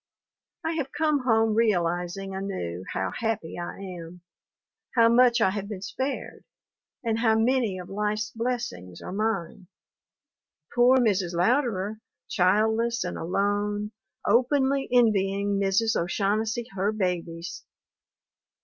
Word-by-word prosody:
I 325 - +1
have 275 -4 -2
come 300 -4 +1
home 225 -2 +3
realizing 190 -3 0
anew 185 - -4
how 95 -1 -2
happy 200 - -3
I 175 - -5
am, 180 -2 -8 0.7
how 230 -1 +6
much 240 0 +5
I 190 - +4
have 200 0 -4
been 195 -3 -6
spared, 265 +5 -4 0.6
and 225 -1 0
how 225 -2 +3
many 230 -4 +2
of 180 -1 -8
life's 210 +2 -2
blessings 225 - -4
are - - -6
mine. 195 -3 -2 1.1
Poor 245 +2 +5
Mrs. 200 -8 +1
Louderer, 215 0 +1 0.3
childless 220 +5 +2
and - - -4
alone, 205 +3 -1 0.3
openly 265 +4 +2
envying 200 -4 +2
Mrs. 200 +3 +2
O'Shaughnessy 215 +6 0
her 195 +2 0
babies! 175 -4 -3
210 Hz, 115 wpm, -26 LUFS, 185-230 Hz, 1.1 s, how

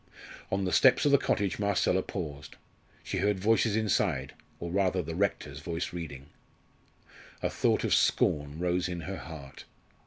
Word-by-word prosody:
On 95 0 0
the 90 - -1
steps 130 +2 +5
of 145 - +4
the 140 - +6
cottage 100 -8 0
Marcella 100 -2 +2
paused. 75 -8 -6 0.5
She 95 - -3
heard 100 0 +1
voices 110 +1 +2
inside 90 -10 0 0.3
or 85 0 -5
rather 95 -1 +1
the 80 +1 -5
rector's 80 -6 -1
voice 85 +3 -4
reading. 75 -6 -6 1.2
A - - 0
thought - - +1
of - - +1
scorn 75 0 +2
rose 90 +1 0
in 90 -1 -4
her 95 +3 -5
heart. 75 -5 -10
90 Hz, 155 wpm, -29 LUFS, 80-100 Hz, 1.2 s, the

